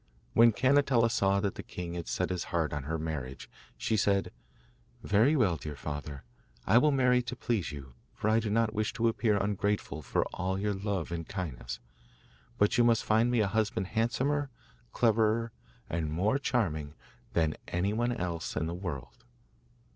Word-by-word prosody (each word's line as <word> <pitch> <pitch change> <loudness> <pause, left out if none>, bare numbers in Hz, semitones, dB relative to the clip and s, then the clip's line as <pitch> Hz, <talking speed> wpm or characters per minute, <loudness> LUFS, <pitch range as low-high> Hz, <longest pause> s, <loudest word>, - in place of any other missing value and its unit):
When 115 +1 +7
Cannetella 130 -1 +3
saw 100 -3 +2
that 100 -2 -1
the - - -7
king 85 -1 -6
had 85 -1 -5
set - - -1
his 90 -2 -2
heart 80 -3 -1
on 75 -2 -3
her 80 +2 -2
marriage, 75 -5 -5 0.3
she - - 0
said: 100 -1 +1 0.7
'Very 110 +9 +4
well, 100 - +2
dear 75 -1 -6
father, 75 -1 -6 0.4
I 115 - +6
will 150 - +4
marry 125 -2 +3
to 125 +1 -5
please 115 -7 -1
you, 70 -3 -9 0.2
for - - -2
I 110 +1 +4
do 110 -1 -2
not 110 +1 +1
wish 110 -1 -1
to 115 -1 +1
appear 110 -2 +2
ungrateful 100 -4 -1
for 65 - 0
all 95 +1 -1
your 105 +1 0
love 95 -4 -3
and 85 -1 -4
kindness; 65 -10 -5 0.8
but 105 +3 +3
you - - +6
must 115 -1 +3
find 110 +3 +3
me 120 -2 +2
a 105 - +2
husband 105 -2 -1
handsomer, 135 +6 0 0.4
cleverer, 115 0 +2 0.4
and 80 -2 -2
more 100 - +1
charming 80 - -1 0.4
than 80 -2 +1
anyone 105 +7 0
else 85 -7 -3
in 80 - 0
the 85 - -3
world. 85 -8 -6
100 Hz, 170 wpm, -30 LUFS, 85-115 Hz, 0.8 s, When